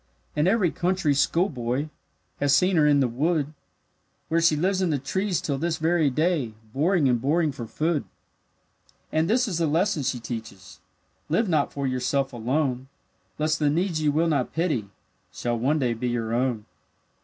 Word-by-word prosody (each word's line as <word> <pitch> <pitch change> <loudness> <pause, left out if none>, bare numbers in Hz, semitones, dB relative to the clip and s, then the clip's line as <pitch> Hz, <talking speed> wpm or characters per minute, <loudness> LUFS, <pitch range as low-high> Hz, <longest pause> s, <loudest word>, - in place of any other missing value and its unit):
And 150 +3 +2
every 195 -4 +3
country 180 -4 +1
schoolboy 140 -3 0 0.5
Has 140 -1 +3
seen 180 +6 +3
her 150 -1 +5
in 145 -1 +4
the 130 - +3
wood; 150 +4 0 0.8
Where 165 +1 +2
she 165 -2 +4
lives 185 +5 +1
in 185 - +1
the 150 - +1
trees 185 +6 -1
till 140 -2 -2
this 165 +1 -1
very 160 -2 +2
day, 150 -5 0 0.2
Boring 155 +1 +2
and 120 -2 +1
boring 155 +3 +2
for 120 -3 -7
food. 155 +4 -1 1.1
And 160 +1 +1
this 245 +3 +2
is 175 -5 -2
the 165 - +2
lesson 165 +2 +1
she 130 -2 -1
teaches: 110 -5 -8 0.5
Live 190 +8 +2
not 155 -5 +1
for 140 -1 -3
yourself 130 +1 -1
alone, 130 +2 -1 0.5
Lest 155 0 0
the 150 -1 +2
needs 165 +1 0
you 150 -1 +2
will 160 +3 +2
not 140 -6 0
pity 155 - -1 0.4
Shall 120 +5 -2
one 140 +6 +2
day 125 -5 +1
be 120 +2 -3
your 115 -2 -2
own. 120 -3 0
150 Hz, 175 wpm, -25 LUFS, 125-170 Hz, 1.1 s, her